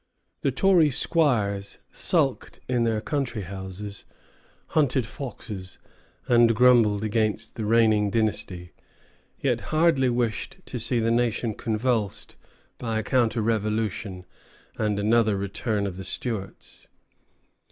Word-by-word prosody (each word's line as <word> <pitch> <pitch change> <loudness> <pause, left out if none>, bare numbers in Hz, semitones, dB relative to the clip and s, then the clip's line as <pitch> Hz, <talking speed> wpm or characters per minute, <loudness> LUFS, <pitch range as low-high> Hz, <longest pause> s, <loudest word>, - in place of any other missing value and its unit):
The - - +2
Troy 185 -6 +4
squires 110 -10 0
sulked - - 0
in 120 -2 +1
their 110 -2 0
country 130 -6 -2
houses, 95 +2 -7 0.7
hunted 135 -5 +2
foxes, 105 -7 -7 0.5
and 120 -1 +5
grumbled 115 -4 +5
against 110 0 -1
the 110 - -4
reigning 110 -2 +3
dynasty; 100 -5 -2 0.7
yet - - +1
hardly 155 -5 +3
wished 120 -3 -2
to 125 - -5
see 115 +2 0
the 115 0 +1
nation 120 -1 +1
convulsed 110 -2 -2 0.4
by 115 -2 -2
a 110 - -1
counter 115 -1 +1
revolution 105 -4 -2 0.5
and 105 -2 0
another 110 0 +3
return 100 +2 -2
of 95 -2 -4
the 95 - -6
Stuarts. 105 0 -5
110 Hz, 115 wpm, -25 LUFS, 105-120 Hz, 0.7 s, and